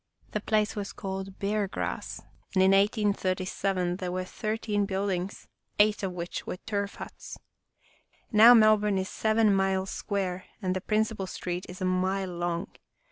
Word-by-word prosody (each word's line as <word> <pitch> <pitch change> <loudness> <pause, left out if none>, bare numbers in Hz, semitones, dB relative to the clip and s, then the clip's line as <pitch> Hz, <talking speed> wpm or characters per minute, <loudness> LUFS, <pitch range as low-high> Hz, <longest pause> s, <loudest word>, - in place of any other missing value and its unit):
The 210 - -2
place 215 0 +1
was 205 -2 -4
called 190 0 -5
Bear 205 0 0
Grass, - - -4 0.3
and 185 - +5
in 190 - +5
1837 195 -3 +1
there 180 -2 -3
were 185 0 -2
thir 215 +4 -3
teen 205 -3 -1
buildings, 190 -1 -2 0.3
eight 210 0 +4
of 190 -2 -2
which 175 0 -5
were - - -4
turf 200 0 -3
huts. - - -9 0.9
Now 225 +3 +9
Melbourne 215 -2 +5
is 190 0 -2
seven 220 -1 +2
miles 190 0 +1
square 185 -2 -3
and 185 -3 -1
the 185 - -2
principal 215 -2 0
street 180 0 -4
is 180 +1 -9
a - - 0
mile 185 0 0
long. 175 +1 -2
195 Hz, 155 wpm, -28 LUFS, 185-210 Hz, 0.9 s, Now